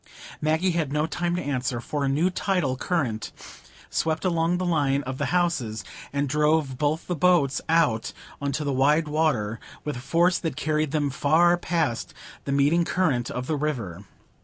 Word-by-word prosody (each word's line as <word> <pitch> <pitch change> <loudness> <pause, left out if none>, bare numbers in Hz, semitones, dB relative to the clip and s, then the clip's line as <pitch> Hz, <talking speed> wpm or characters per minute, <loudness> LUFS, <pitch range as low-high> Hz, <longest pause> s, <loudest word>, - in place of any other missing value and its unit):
Maggie 160 +4 +2
had 165 -5 -1
no 150 +1 +1
time 175 +2 -2
to 180 - -2
answer, 130 -3 -1
for 145 +4 -3
a 135 - +1
new 160 +7 +2
tidal 180 -9 0
current 130 -8 -2 0.6
swept 160 +3 -1
along 170 0 +1
the 185 - -2
line 145 -5 +1
of 130 +1 -5
the - - 0
houses, 145 - 0 0.3
and 140 0 0
drove 150 -2 +1
both 150 +2 0
the 180 - -2
boats 155 -4 +3
out 155 -10 +2 0.3
on 140 0 -1
to 150 +2 -2
the 140 -1 -1
wide 150 +4 +3
water, 140 -9 0 0.2
with 150 -1 -3
a - - -5
force 170 +7 +2
that 160 -6 -3
carried 155 +1 0
them 145 -1 0
far 165 +6 +4
past 165 -8 -2 0.3
the 140 - -2
meeting 145 +5 +3
current 145 -10 0
of 125 0 -4
the 155 - -1
river. 120 - -3
150 Hz, 180 wpm, -25 LUFS, 135-165 Hz, 0.6 s, far